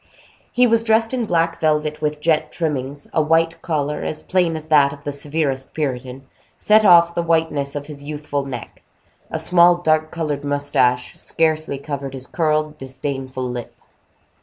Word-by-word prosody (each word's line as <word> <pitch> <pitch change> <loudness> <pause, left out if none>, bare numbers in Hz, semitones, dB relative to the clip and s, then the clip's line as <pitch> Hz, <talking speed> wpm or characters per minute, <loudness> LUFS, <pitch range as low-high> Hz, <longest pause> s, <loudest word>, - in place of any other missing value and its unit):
He 250 0 +4
was 230 -1 +3
dressed 225 +1 +2
in 245 -4 -1
black 165 -2 +1
velvet 150 -1 0
with 150 0 -2
jet 155 -1 +1
trimmings; 145 -3 -3
a 160 - +3
white 165 +1 +1
collar, 150 -3 -2
as 155 - -3
plain 180 -3 +1
as 155 -1 -6
that 145 -3 +5
of 140 0 -11
the 145 - -3
severest 140 -2 -1
Puritan, 130 -3 -4 0.3
set 215 +1 +4
off 170 -3 +6
the 170 - 0
whiteness 160 -4 0
of 145 -1 -4
his 145 -2 -9
youthful 145 -1 -4
neck; 125 -4 -8 0.5
a - - -3
small 175 0 +5
dark 155 -2 +1
colored 150 -4 -3
mustache 145 -3 0
scarcely 155 -3 0
covered 140 -1 -5
his 130 -1 -6
curled, 155 0 -1
disdainful 130 -1 -5
lip. 125 -1 -6
150 Hz, 160 wpm, -20 LUFS, 140-165 Hz, 0.5 s, off